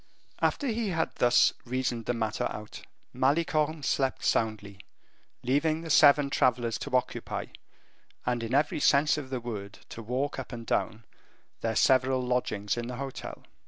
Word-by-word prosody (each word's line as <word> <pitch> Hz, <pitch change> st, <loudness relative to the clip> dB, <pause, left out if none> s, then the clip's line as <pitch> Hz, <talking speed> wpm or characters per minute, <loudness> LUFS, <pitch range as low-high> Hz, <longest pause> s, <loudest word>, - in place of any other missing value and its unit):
After 285 Hz, -, 0 dB
he 230 Hz, -4 st, -1 dB
had 165 Hz, -3 st, -1 dB
thus 120 Hz, 0 st, +4 dB
reasoned 125 Hz, -2 st, -2 dB
the 120 Hz, -, 0 dB
matter 110 Hz, -2 st, -1 dB
out, 105 Hz, 0 st, -8 dB, 0.3 s
Malicorne 155 Hz, +3 st, +1 dB
slept 135 Hz, 0 st, 0 dB
soundly, 105 Hz, -3 st, -1 dB, 0.6 s
leaving 150 Hz, +5 st, +1 dB
the 165 Hz, -1 st, -5 dB
seven 145 Hz, -1 st, +6 dB
travelers 120 Hz, -4 st, +1 dB
to 145 Hz, -3 st, -3 dB
occupy, 125 Hz, -, -3 dB, 0.8 s
and 120 Hz, -1 st, 0 dB
in 115 Hz, +3 st, -2 dB
every 150 Hz, +1 st, +1 dB
sense 145 Hz, +1 st, +4 dB
of 135 Hz, -3 st, -8 dB
the 130 Hz, -1 st, -2 dB
word 105 Hz, -4 st, -6 dB, 0.2 s
to 115 Hz, -, -8 dB
walk 130 Hz, +6 st, -2 dB
up 130 Hz, -, -7 dB
and 115 Hz, -1 st, -7 dB
down, 115 Hz, 0 st, -1 dB, 0.5 s
their 115 Hz, -1 st, -2 dB
several 130 Hz, +2 st, +3 dB
lodgings 120 Hz, -5 st, -1 dB
in 120 Hz, 0 st, -3 dB
the 125 Hz, -, -5 dB
hotel. 135 Hz, +1 st, -7 dB
125 Hz, 155 wpm, -28 LUFS, 115-145 Hz, 0.8 s, seven